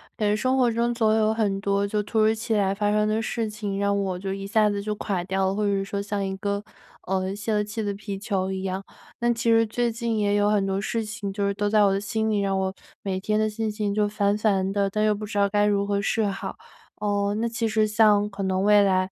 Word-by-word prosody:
感 210 Hz, -, 0 dB
觉 -, -, +2 dB
生 255 Hz, +4 st, +1 dB
活 245 Hz, -2 st, +3 dB
中 235 Hz, +1 st, 0 dB
总 225 Hz, -2 st, +2 dB
有 220 Hz, 0 st, +3 dB
很 205 Hz, -3 st, 0 dB
多 200 Hz, 0 st, +1 dB
就 210 Hz, +1 st, -1 dB
突 220 Hz, +2 st, -2 dB
如 215 Hz, +1 st, +4 dB
其 225 Hz, 0 st, -2 dB
来 195 Hz, -2 st, +2 dB
发 205 Hz, +1 st, 0 dB
生 210 Hz, 0 st, +2 dB
的 215 Hz, +1 st, 0 dB
事 230 Hz, -1 st, -2 dB
情 210 Hz, -2 st, -4 dB
让 200 Hz, 0 st, +1 dB
我 185 Hz, -2 st, -2 dB
就 195 Hz, +1 st, -4 dB
一 195 Hz, 0 st, -5 dB
下 215 Hz, 0 st, +3 dB
子 200 Hz, 0 st, -2 dB
就 210 Hz, +1 st, -3 dB
垮 195 Hz, -4 st, -2 dB
掉 190 Hz, 0 st, 0 dB
了， 190 Hz, -, +1 dB
或 210 Hz, -, -1 dB
者 205 Hz, -, +2 dB
是 195 Hz, -1 st, 0 dB
说 200 Hz, 0 st, -3 dB
像 200 Hz, -1 st, -2 dB
一 190 Hz, -, -3 dB
个， 200 Hz, +1 st, -2 dB, 0.4 s
呃， 190 Hz, +1 st, -1 dB
泄 215 Hz, +2 st, -2 dB
了 210 Hz, 0 st, +2 dB
气 215 Hz, +1 st, -4 dB
的 205 Hz, -, -1 dB
皮 200 Hz, 0 st, -6 dB
球 190 Hz, -2 st, -2 dB
一 190 Hz, 0 st, -4 dB
样。 190 Hz, 0 st, -3 dB, 0.4 s
那 240 Hz, 0 st, +2 dB
其 230 Hz, 0 st, +1 dB
实 225 Hz, 0 st, +4 dB
最 235 Hz, +2 st, 0 dB
近 230 Hz, -1 st, -2 dB
也 205 Hz, -1 st, +1 dB
有 205 Hz, 0 st, +3 dB
很 205 Hz, -2 st, +2 dB
多 195 Hz, 0 st, -1 dB
事 225 Hz, +1 st, -2 dB
情 210 Hz, -2 st, -5 dB
就 200 Hz, +1 st, -1 dB
是 200 Hz, -, 0 dB
都 205 Hz, +1 st, -1 dB
在 210 Hz, 0 st, +4 dB
我 200 Hz, -1 st, +4 dB
的 195 Hz, -, -1 dB
心 220 Hz, +1 st, -1 dB
里， 210 Hz, -, +1 dB
让 195 Hz, -1 st, 0 dB
我 190 Hz, 0 st, -1 dB, 0.3 s
每 190 Hz, -2 st, -2 dB
天 210 Hz, +2 st, 0 dB
的 215 Hz, -, +2 dB
心 220 Hz, +1 st, -2 dB
情 210 Hz, -1 st, -2 dB
就 210 Hz, 0 st, +2 dB
烦 205 Hz, -1 st, +1 dB
烦 195 Hz, -3 st, +1 dB
的， 200 Hz, -1 st, +1 dB
但 215 Hz, +2 st, 0 dB
又 215 Hz, -, +3 dB
不 210 Hz, +1 st, -6 dB
知 205 Hz, -, -5 dB
道 200 Hz, 0 st, +4 dB
该 205 Hz, +1 st, +1 dB
如 200 Hz, -1 st, +1 dB
何 200 Hz, 0 st, 0 dB
是 220 Hz, +2 st, +1 dB
好。 195 Hz, -1 st, -4 dB, 0.4 s
呃， 205 Hz, -1 st, 0 dB
那 225 Hz, +2 st, 0 dB
其 230 Hz, 0 st, -1 dB
实 215 Hz, 0 st, +2 dB
像 210 Hz, -1 st, +4 dB
可 195 Hz, 0 st, -6 dB
能 190 Hz, 0 st, 0 dB
未 210 Hz, 0 st, +6 dB
来， 185 Hz, -1 st, +2 dB
205 Hz, 295 characters per minute, -25 LUFS, 195-215 Hz, 0.4 s, 未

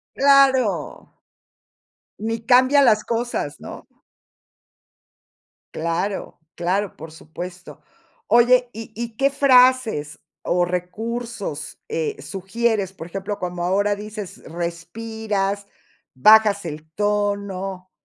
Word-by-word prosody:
¡Claro! 265 Hz, -, +3 dB, 1.1 s
Ni 225 Hz, +1 st, -3 dB
cambia 255 Hz, +4 st, +5 dB
las 215 Hz, -5 st, +4 dB
cosas, 240 Hz, +1 st, -3 dB
¿no? -, -, -10 dB, 1.9 s
Claro, 170 Hz, +5 st, -3 dB, 0.2 s
claro, 185 Hz, +3 st, -1 dB
por 160 Hz, +1 st, -9 dB
supuesto. 175 Hz, +3 st, -9 dB, 0.5 s
Oye, 245 Hz, +1 st, +5 dB
¿y 225 Hz, 0 st, -8 dB
y 230 Hz, 0 st, -6 dB
qué 275 Hz, +3 st, +2 dB
frases 255 Hz, -, +3 dB, 0.2 s
o 175 Hz, 0 st, +1 dB
recursos, 195 Hz, -2 st, -5 dB
eh, 455 Hz, -2 st, -3 dB
sugieres? 200 Hz, +1 st, -1 dB
Por 165 Hz, -4 st, -9 dB
ejemplo, 195 Hz, +3 st, -5 dB
como 175 Hz, -1 st, -4 dB
ahora 200 Hz, +3 st, +1 dB
dices 210 Hz, -1 st, -8 dB
respiras, 200 Hz, +4 st, -3 dB, 0.5 s
bajas 205 Hz, +6 st, +5 dB
el 155 Hz, 0 st, -8 dB
tono, 200 Hz, -2 st, -2 dB
205 Hz, 95 wpm, -22 LUFS, 180-235 Hz, 1.9 s, cambia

